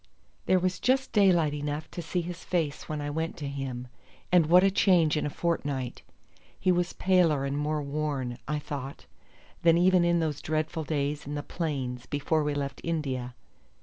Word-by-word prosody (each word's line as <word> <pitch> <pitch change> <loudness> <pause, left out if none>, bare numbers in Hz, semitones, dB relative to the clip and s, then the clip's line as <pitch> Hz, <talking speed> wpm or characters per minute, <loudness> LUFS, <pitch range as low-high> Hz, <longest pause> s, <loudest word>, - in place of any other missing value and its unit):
There 185 - +5
was 185 0 0
just 260 +1 +1
daylight 175 -8 +4
enough 150 +1 -4
to 175 - -5
see 170 +2 -2
his 175 +1 -7
face 160 -5 -2
when 155 -1 -3
I 145 0 -3
went 160 +3 -3
to 145 -4 -4
him; 135 -3 -5 0.4
and 175 -3 +5
what 180 +3 +7
a 195 - +4
change 175 -6 +4
in 150 - 0
a - - -2
fortnight! 145 -6 -2 0.6
He 185 - +3
was 175 -1 0
paler 170 -7 +3
and 140 0 -2
more 150 +1 -1
worn, 140 -4 -3
I 150 +1 0
thought, 140 -2 -6 0.6
than 165 0 +5
even 180 0 +5
in 170 0 +3
those 155 -3 -2
dreadful 155 +1 -2
days 145 -1 -2
in 145 - -4
the 145 - -3
plains 130 -8 -3
before 150 +2 0
we 145 -1 -1
left 140 -1 -4
India. 130 -7 -2
155 Hz, 180 wpm, -28 LUFS, 145-170 Hz, 0.6 s, what